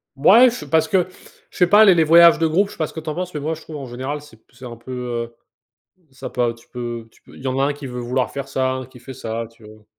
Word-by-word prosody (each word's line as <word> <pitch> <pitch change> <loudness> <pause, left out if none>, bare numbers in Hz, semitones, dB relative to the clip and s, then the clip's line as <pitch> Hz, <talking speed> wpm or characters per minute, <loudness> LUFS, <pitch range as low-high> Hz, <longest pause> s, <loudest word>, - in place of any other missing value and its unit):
Ouais, 225 - +6
je 245 - -7
parce 160 -1 +2
que 185 -2 +1 0.4
je - - -16
sais 180 - +4
pas, 210 +3 +7
les 190 -3 +6
les 165 - +4
voyages 170 +2 +7
de 165 - +2
groupe, 190 +6 +2
je - - -13
sais - - -16
pas 155 - -1
ce - - -14
que 160 - -6
tu 155 0 -6
en 150 - -4
penses, 180 -1 -4
mais 150 - -4
moi 155 +3 -2
je 160 - -9
trouve 155 -2 -9
en 135 - -7
général, 130 +4 -5
c'est 145 -6 -17
p - - -37
c'est 125 +1 -12
un 120 -1 -8
peu, 115 +3 -12
heu, 120 -2 -5 0.8
ça 130 - -8
pas 120 -1 -1
tu 115 +1 -21
peux 120 -2 -6
tu - - -26
peux - - -17
il - - -13
y - - -3
en 130 +1 -1
a - - +2
un 145 - 0
qui 145 -1 -9
veut 125 -1 -6
vouloir 125 +1 -1
faire 140 -1 -6
ça, 130 -1 -1
un, 130 -1 -5
qui 130 0 -16
fait 130 +2 -10
ça, 115 -3 -5
tu 115 0 -22
vois? 110 0 -15
130 Hz, 325 wpm, -20 LUFS, 120-160 Hz, 0.8 s, pas